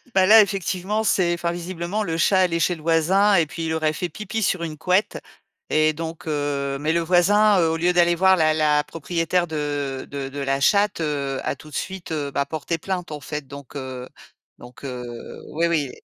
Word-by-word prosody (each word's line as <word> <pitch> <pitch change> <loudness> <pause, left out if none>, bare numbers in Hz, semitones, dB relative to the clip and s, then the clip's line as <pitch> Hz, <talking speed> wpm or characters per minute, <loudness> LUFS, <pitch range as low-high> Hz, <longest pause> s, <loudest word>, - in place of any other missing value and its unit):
Bah 190 - +5
là, 220 +3 +9
effectivement, 195 +1 -1
c'est 180 -4 +2
enfin 170 0 -2
visiblement 175 +3 -4
le 165 -5 -2
chat 190 +3 +3
allait 170 -2 +2
chez 175 +2 +2
le 160 - -13
voisin 180 +6 +3
et 165 -3 +4
puis 165 +2 -6
il 160 - -1
aurait 155 -1 0
fait 175 +2 -3
pipi 215 +6 -5
sur 185 -3 0
une 160 -2 -4
couette, 185 +5 +1 0.5
et 155 0 +3
donc, 165 +1 -7
heu, 145 -2 -1
mais 155 +2 0
le 170 - +2
voisin, 195 +4 +4
heu, 165 - +3
au 160 - -1
lieu 175 +2 +2
d'aller 175 -1 +4
voir 190 +2 +5
la 155 -2 +3
la 150 -1 +2
propriétaire 165 +3 -1
de 145 -3 -3
de 140 -1 -5
de 140 +1 -7
la 135 0 0
chatte, 200 +4 +2
heu, 140 -3 -2
à - - -2
tout 155 - -14
de 145 - -10
suite, 190 -3 -5
heu, 145 -3 -2
bah, 140 0 0
porté 160 +3 -3
plainte 180 -2 -4
en 150 - -5
fait, 145 +1 -6
donc, 140 0 -11
heu, 130 -2 -6 0.5
donc, 125 +2 -14
heu, 125 -2 -5 0.5
ouais, 170 +2 +1
oui 150 -6 0
et - - -16
165 Hz, 215 wpm, -23 LUFS, 145-180 Hz, 0.5 s, là